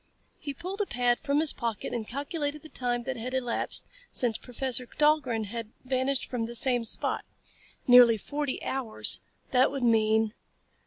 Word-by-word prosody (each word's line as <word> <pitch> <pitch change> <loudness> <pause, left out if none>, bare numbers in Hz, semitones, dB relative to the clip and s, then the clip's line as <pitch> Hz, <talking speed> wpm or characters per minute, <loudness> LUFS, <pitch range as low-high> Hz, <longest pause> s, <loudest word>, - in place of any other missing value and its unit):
He 285 -2 -5
pulled 370 +7 -5
a 410 - -1
pad 245 0 +2
from 285 0 0
his 315 -1 +4
pocket 230 -3 -3
and 225 -3 -3
calculated 290 +2 -3
the 315 - -11
time 245 -3 -2
that 260 0 -4
had 250 +3 -4
elapsed 245 -3 +1 0.3
since 240 -3 +1
Professor 250 0 -1
Dahlgren 295 -7 +2
had 225 +1 -6 0.2
vanished 260 +1 0
from 235 -3 -3
that 235 - -7
same 245 -1 +1
spot. 225 - +1 0.6
Nearly 245 -2 +8
forty 285 +5 -4
hours. 260 -5 0 0.3
That 255 0 +4
would 275 -2 -4
mean.... 220 -1 +3
250 Hz, 160 wpm, -28 LUFS, 235-280 Hz, 0.6 s, Nearly